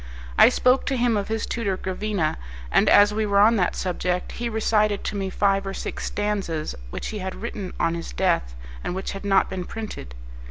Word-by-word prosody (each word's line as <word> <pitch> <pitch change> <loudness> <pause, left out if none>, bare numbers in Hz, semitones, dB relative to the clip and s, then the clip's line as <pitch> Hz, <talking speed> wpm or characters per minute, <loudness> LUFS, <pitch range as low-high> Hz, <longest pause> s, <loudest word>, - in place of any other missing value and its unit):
I - - +8
spoke 255 +1 +2
to 270 - +1
him 240 -2 +2
of 200 -1 -1
his 220 0 -2
tutor 200 -5 -2
Gravina, 190 - -2 0.3
and - - +4
as 205 0 +6
we 215 0 0
were 200 -1 +2
on 220 +3 +6
that 180 -3 +1
subject 180 0 -2
he 240 0 -3
recited 215 -2 +1
to - - -3
me 195 -1 -2
five 195 0 +1
or 195 - -4
six - - -5
stanzas 200 -7 -2 0.2
which - - -5
he 215 - -5
had 190 0 -4
written 210 -5 -5
on 165 - +2
his 170 0 -5
death, - - 0 0.3
and 180 - -3
which 190 - -3
had 195 - -7
not 195 -1 +4
been 185 -1 -4
printed. 175 - -7
200 Hz, 205 wpm, -24 LUFS, 185-215 Hz, 0.3 s, I